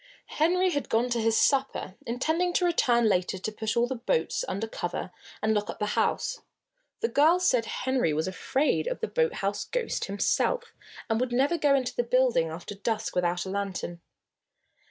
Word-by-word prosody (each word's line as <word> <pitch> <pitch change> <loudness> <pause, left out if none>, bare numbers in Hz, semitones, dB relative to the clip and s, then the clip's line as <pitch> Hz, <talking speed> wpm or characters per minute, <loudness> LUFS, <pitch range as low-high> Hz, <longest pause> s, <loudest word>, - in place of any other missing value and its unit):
Henry 365 +3 +3
had 285 -4 -2
gone 240 +2 +1
to 235 -1 +1
his 225 0 +2
supper, 270 -8 +1
intending 320 +9 0
to 360 - +2
return 240 -9 +3
later 185 -2 +1
to 205 +4 -4
put 220 +1 -3
all 235 - +4
the 255 - -3
boats 460 - 0
under 210 +3 -2
cover 180 -4 -4 0.3
and 220 0 +3
lock 210 -1 -1
up - - -5
the 210 - -1
house. - - 0 0.6
The 460 - +2
girls 340 +2 +4
said 245 -9 +3
Henry 260 -8 0
was 155 +3 -1
afraid 265 - 0
of - - -2
the 450 - 0
boathouse 205 - 0
ghost - - -2
himself, 460 - 0 0.3
and 225 -1 +1
would 250 0 -1
never 275 +7 +2
go 290 -4 +3
into 255 -2 -1
the - - +2
building 240 -8 +2
after 170 +5 -7
dusk 210 +2 -3
without 175 0 0
a 190 - -5
lantern. 190 -3 -4
240 Hz, 180 wpm, -27 LUFS, 200-315 Hz, 0.6 s, all